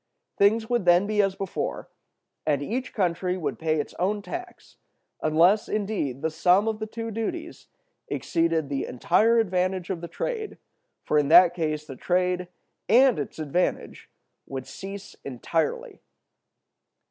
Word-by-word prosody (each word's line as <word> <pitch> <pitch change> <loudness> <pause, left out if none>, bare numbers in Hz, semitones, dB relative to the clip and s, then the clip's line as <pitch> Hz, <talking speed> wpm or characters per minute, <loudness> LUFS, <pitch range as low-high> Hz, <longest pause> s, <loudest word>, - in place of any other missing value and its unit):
Things 220 +3 +3
would 240 -5 0
then 175 +2 +5
be 210 0 +2
as 195 -1 0
before, 195 -2 -4 0.6
and 145 -2 0
each 250 - -3
country 180 -1 0
would 170 - -3
pay 155 -1 0
its 145 - -4
own 200 +3 0
tax—unless, 195 - -1
indeed, 195 - -2
the 160 - 0
sum 180 +6 +3
of 220 -1 -1
the 220 - -4
two 230 +1 -5
duties 270 +10 -5 0.4
exceeded 165 -3 0
the 140 -1 -2
entire 225 - +3
advantage 185 -3 0
of 175 -3 -4
the 170 - -5
trade, 440 - -4 0.5
for 150 - +2
in 145 - +1
that 175 +3 +7
case 155 -3 -2
the 135 - -8
trade 180 +4 0 0.4
and 250 - +5
its 145 - -5
advantage 160 +3 -2 0.4
would 130 -1 -5
cease 200 +1 -8
entirely. 165 - -2
185 Hz, 140 wpm, -26 LUFS, 160-215 Hz, 0.6 s, that